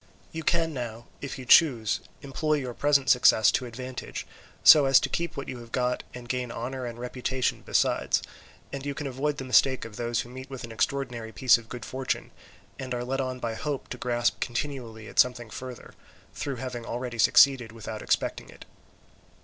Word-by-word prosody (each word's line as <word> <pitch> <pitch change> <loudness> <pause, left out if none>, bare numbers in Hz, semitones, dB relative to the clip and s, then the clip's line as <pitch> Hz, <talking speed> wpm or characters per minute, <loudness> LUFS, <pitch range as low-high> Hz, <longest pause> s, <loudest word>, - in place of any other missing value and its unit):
You 160 - -5
can 165 0 +1
now, 120 -3 -5 0.2
if 140 0 -5
you 130 - -8
choose, 120 -6 +5 0.2
employ 155 +3 0
your 130 -4 -3
present 140 +1 +2
success 115 -3 +6
to 125 - -1
advantage, 125 +2 -6 0.4
so 150 -3 +9
as 135 0 +6
to - - -2
keep 170 -1 -3
what 140 - -5
you 125 - -6
have 115 -1 -12
got 125 0 0
and 125 -1 -9
gain 125 -1 -2
honour 125 +2 -4
and 120 -1 -7
reputation 125 +1 -2
besides, - - +1 0.5
and 140 -1 -4
you 140 0 -3
can 150 - -5
avoid 140 +2 -2
the 135 - -4
mistake 130 0 +3
of 110 -2 -10
those 120 0 -1
who 120 - -10
meet 130 +2 -9
with 135 -2 -7
an 115 - -7
extraordinary 120 -1 -2
piece 120 +4 +4
of 115 -1 -16
good 120 -4 -7
fortune, 130 0 -3 0.5
and 130 -2 -4
are 120 - -3
led 135 +2 -1
on 130 -1 -3
by 115 -2 -3
hope 140 +4 -4
to 125 - -6
grasp 120 -1 0
continually 120 -4 -4
at - - -4
something 120 -3 +3
further, 125 0 -8 0.4
through 140 -2 -4
having 125 -1 -5
already 120 0 -5
succeeded 125 0 +5
without 110 -1 -7
expecting - - -1
it. - - -13
125 Hz, 190 wpm, -27 LUFS, 120-135 Hz, 0.5 s, so